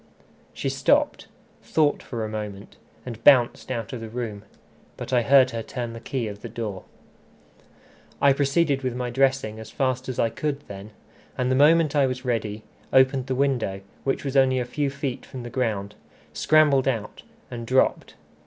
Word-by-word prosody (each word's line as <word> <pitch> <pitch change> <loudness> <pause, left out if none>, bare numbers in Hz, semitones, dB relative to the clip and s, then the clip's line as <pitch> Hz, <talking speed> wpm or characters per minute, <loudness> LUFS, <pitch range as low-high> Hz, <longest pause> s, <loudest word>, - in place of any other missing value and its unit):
She - - -4
stopped, - - +1 0.3
thought 150 -2 +1
for 115 -3 -4
a - - -3
moment, 105 -2 -7 0.3
and 115 -2 -8
bounced 130 -5 +5
out 115 -3 -4
of 120 - -5
the 115 - -7
room. 110 -3 -5 0.6
But - - -6
I 125 - +4
heard 130 +1 +5
her 115 - -3
turn 120 0 -5
the 115 - -8
key 125 -1 -3
of 105 -1 -8
the 120 - -7
door. 110 -4 -5 1.3
I 140 -1 +5
proceeded 140 0 +1
with 130 -2 -2
my 125 -1 -3
dressing 130 -4 +1
as 110 - -9
fast 130 -2 -1
as 130 - -4
I 115 - +1
could 145 +3 -3
then; 100 -4 -10 0.5
and 125 0 0
the - - +3
moment 155 +2 +4
I 140 -2 +4
was 130 0 -5
ready, 110 -3 -2 0.3
opened 130 0 +3
the 130 - -1
window, 125 -8 0 0.2
which 135 +1 -1
was 135 0 -3
only 130 -1 +4
a 125 - -1
few 140 +3 -1
feet 140 -2 -4
from 125 -2 -9
the 120 - -8
ground, 110 -6 -2 0.4
scrambled 150 -4 +3
out, 115 -6 -2 0.3
and 120 -1 -6
dropped. 130 +2 +1
125 Hz, 180 wpm, -24 LUFS, 115-135 Hz, 1.3 s, bounced